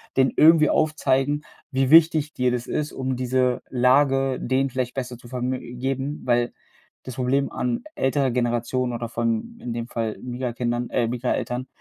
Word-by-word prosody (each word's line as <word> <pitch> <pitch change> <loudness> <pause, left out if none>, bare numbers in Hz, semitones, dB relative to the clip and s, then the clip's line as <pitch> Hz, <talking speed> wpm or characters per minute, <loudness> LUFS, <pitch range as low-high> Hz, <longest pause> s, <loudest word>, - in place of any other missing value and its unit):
denen 130 0 +3
irgendwie 155 -1 +6
aufzeigen, 145 -1 +1 0.3
wie 130 0 +1
wichtig 155 -1 +5
dir 125 0 +1
das 120 -1 -3
ist, 150 0 -2
um 130 0 -2
diese 125 0 +1
Lage 135 +1 +3
denen 130 +2 0
vielleicht 125 -1 -3
besser 125 -2 -5
zu 120 - -15
verm 125 0 -3 0.3
geben, 135 +3 -2
weil 120 -1 +1 0.5
das 130 - -8
Problem 135 +2 0
an 125 -1 -2
älterer 135 -1 +1
Generationen 120 +1 -1
oder 115 0 -4
von, 115 - -2
in 120 -2 -4
dem 115 0 -4
Fall 115 -3 -3
Migra-Kindern, 120 -1 -3
äh, 115 - +1
Migra-Eltern, 125 +1 -2
130 Hz, 160 wpm, -24 LUFS, 120-135 Hz, 0.5 s, irgendwie